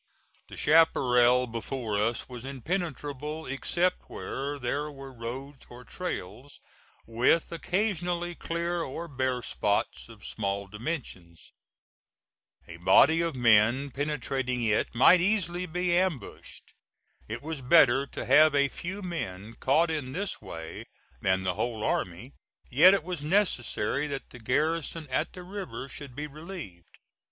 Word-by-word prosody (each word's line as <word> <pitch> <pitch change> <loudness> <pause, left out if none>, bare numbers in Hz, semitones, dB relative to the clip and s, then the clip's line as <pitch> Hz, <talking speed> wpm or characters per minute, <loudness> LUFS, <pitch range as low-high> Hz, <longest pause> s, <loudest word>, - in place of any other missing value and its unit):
The - - -10
chaparral 125 -6 +5
before 115 -1 -4
us 110 +3 0
was 125 -2 -8
impenetrable 150 +1 -4
except 175 +7 -1
where 140 +2 -4
there 145 +3 -2
were 135 -1 -10
roads 130 +4 -7
or 120 +1 -11
trails, 130 - -6 0.5
with 120 +8 +2
occasionally 175 -1 -1
clear 170 +1 -2
or 165 +3 -5
bare 130 -4 -1
spots 105 +2 -1
of 110 -2 -13
small 100 -1 -2
dimensions. 105 - -7 1.1
A 85 - -9
body 160 - +5
of 165 -3 -1
men 120 +3 +4
penetrating 135 -3 -2
it 110 +1 +1
might 170 +9 +7
easily 180 -2 0
be 180 +1 0
ambushed. 180 -6 -3 0.5
It 115 +4 -6
was 155 -2 -5
better 135 -1 +5
to - - -6
have 155 -1 +6
a 140 -1 +3
few 190 +7 -6
men 110 - -5
caught 160 +5 +3
in 140 -5 -3
this 195 +5 -3
way 80 -5 -8 0.4
than 95 0 +1
the 95 -1 0
whole 110 +3 -3
army, 95 +10 -2 0.4
yet 175 +10 +8
it 195 - -2
was 175 -3 -4
necessary 150 - +1
that 140 -2 -6
the 120 - -11
garrison 155 +6 -1
at 130 - -1
the 180 - -9
river 185 -7 -6
should 140 -1 -9
be 150 - -4
relieved. 150 - -10
140 Hz, 135 wpm, -28 LUFS, 120-165 Hz, 1.1 s, yet